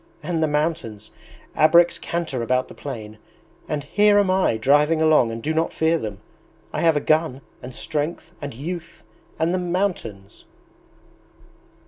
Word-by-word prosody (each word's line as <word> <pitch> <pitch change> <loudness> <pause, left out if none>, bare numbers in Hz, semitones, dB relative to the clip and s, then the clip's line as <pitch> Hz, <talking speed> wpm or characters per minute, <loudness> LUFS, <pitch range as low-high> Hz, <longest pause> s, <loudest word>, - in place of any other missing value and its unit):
and 170 -2 -1
the 155 - +3
mountains! 150 -8 -2 0.4
'Abreks 170 +2 +5
canter 165 -7 -3
about 125 +2 0
the - - -12
plain, 110 -6 -8 0.5
and 150 -2 -2
here 205 +7 +3
am 200 -2 +3
I 185 -11 +2
driving 145 +7 +3
along 155 -7 +4
and 115 0 -6
do 155 - 0
not 160 +1 0
fear 160 +1 +1
them! 105 -5 -5 0.6
I - - -2
have 165 -3 +4
a - - +3
gun, 155 -3 +1 0.2
and 125 -1 -9
strength, 160 +2 -3
and 145 -1 -5
youth... 170 +7 -7 0.3
and 165 +2 +1
the 185 - +1
mountains!' 175 - -3
155 Hz, 150 wpm, -22 LUFS, 130-170 Hz, 0.6 s, Abreks